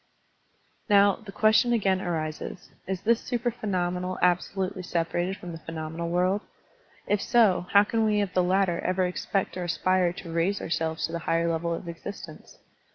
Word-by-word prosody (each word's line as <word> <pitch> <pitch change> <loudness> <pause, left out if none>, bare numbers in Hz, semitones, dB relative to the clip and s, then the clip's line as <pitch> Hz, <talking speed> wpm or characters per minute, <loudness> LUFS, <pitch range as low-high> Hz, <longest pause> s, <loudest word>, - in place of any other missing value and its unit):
'* - - -41
Now, 200 -1 +5
the 215 -3 -11
question 220 +4 +4
again 195 -4 +2
arises. 160 0 -4 0.2
Is 190 -1 -3
this 230 +1 +2
supra 240 -1 -1
phenomenal 180 -4 -2
absolutely 185 +1 0
separated 175 +2 -1
from 180 -3 -8
the 165 - -7
phe 165 - -12
nomenal 160 +1 -4
world? 180 +4 +1 0.6
If 205 -1 +1
so, 220 -7 +3
how 200 0 +8
can 225 +2 0
we 210 -1 +2
of 200 -3 -1
the 185 - +3
latter 180 -1 +2
ever 185 0 0
expect 185 +1 -2
or 180 - -3
aspire 180 +1 +1
to 170 -2 -8
raise 175 +5 +1
ourselves 160 0 -1
to - - -6
the 170 - -3
higher 165 0 +2
level 170 0 -1
of 170 +1 -4
existence? 170 -1 -9
185 Hz, 175 wpm, -27 LUFS, 170-200 Hz, 0.6 s, how